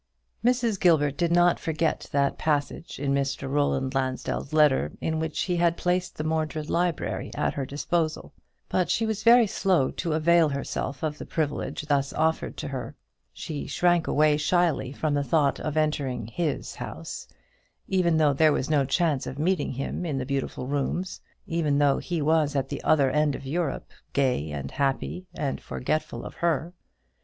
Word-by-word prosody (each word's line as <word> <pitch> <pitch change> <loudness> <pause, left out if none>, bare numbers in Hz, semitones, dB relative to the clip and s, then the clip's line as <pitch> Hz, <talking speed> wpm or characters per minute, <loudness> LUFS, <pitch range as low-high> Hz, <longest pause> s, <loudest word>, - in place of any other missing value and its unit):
Mrs. 240 -4 +2
Gilbert 150 -6 +3
did 170 +1 0
not 175 0 +4
forget 160 0 -1
that 140 -1 +1
passage 150 +1 -1
in 140 0 0 0.3
Roland 135 -1 0
Lansdell's 130 +1 -2
letter, 150 - +3
in 160 0 -1
which 160 -1 -2
he 180 -2 0
had 170 0 +2
placed 180 0 -1
the 155 - -2
Mordred 155 -1 -2
library 175 -3 -1
at - - 0
her 135 -2 -3
disposal. 155 +2 -2 0.3
But 180 -1 0
she 225 - +1
was 220 -1 -2
very 235 +1 +7
slow 185 -8 +1
to 165 - -2
avail 165 +1 +4
herself 140 -1 -4
of 155 -1 -2
the - - -6
privilege 150 -1 -2
thus 140 -2 +1
offered 160 +1 0
to 145 - -4
her. 125 -4 -5 0.4
She 145 - -6
shrank 175 +2 +2
away 150 0 +3
shyly 155 -4 +1
from 150 +1 -1
the 145 0 +1
thought 140 +1 +2
of 155 0 -3
entering 145 -6 0
his 150 +6 -3
house, - - -7 0.6
even 180 -4 +2
though 150 -2 +4
there 155 +3 +4
was 140 +1 -1
no 145 -3 +3
chance 150 -1 +1
of 130 - -6
meeting 165 -1 0
him 135 +6 -3
in 155 -6 -2
the 130 - -2
beautiful 135 -1 -3
rooms; 145 +7 -2 0.2
even 155 -4 0
though 145 -1 +3
he 170 -4 -2
was 155 -1 +2
at 135 -1 0
the - - -5
other 140 -4 +4
end 150 0 +2
of - - -8
Europe, 155 +1 -2 0.2
gay 125 - +1
and 70 -2 -5
happy, 140 +6 -2
and 140 -3 -2
forgetful 155 +4 -3
of - - -7
her. 170 0 0
155 Hz, 170 wpm, -26 LUFS, 140-170 Hz, 0.6 s, very